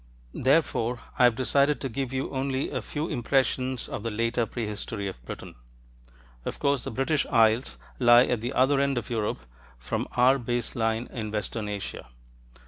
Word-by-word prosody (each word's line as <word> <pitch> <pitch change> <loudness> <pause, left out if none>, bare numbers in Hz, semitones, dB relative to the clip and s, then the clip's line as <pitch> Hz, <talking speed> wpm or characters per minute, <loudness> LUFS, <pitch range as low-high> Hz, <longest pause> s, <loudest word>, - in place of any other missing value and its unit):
Therefore, 130 -4 +1 0.2
I 125 - +7
have 120 -2 +4
decided 140 +3 +2
to 135 - -1
give 130 +1 -3
you 130 0 -2
only 135 0 -1
a - - -2
few 150 +2 -4
impressions 130 0 0
of - - -5
the 115 - -2
later 115 +1 0
prehistory 105 -2 -4
of 90 -11 -8
Britain. - - -7 0.9
Of - - -4
course 140 -3 +1
the - - -4
British 135 +5 0
Isles 115 +2 +3 0.2
lie 120 0 +7
at 120 -3 -1
the 120 +3 -3
other 135 +2 +3
end 140 -1 +1
of 120 0 -4
Europe 110 - -1 0.4
from - - -3
our 130 +2 +5
base 120 -1 -2
line 115 +1 0
in 110 -3 -4
western 105 0 -3
Asia. 100 -10 -5
120 Hz, 170 wpm, -27 LUFS, 115-135 Hz, 0.9 s, I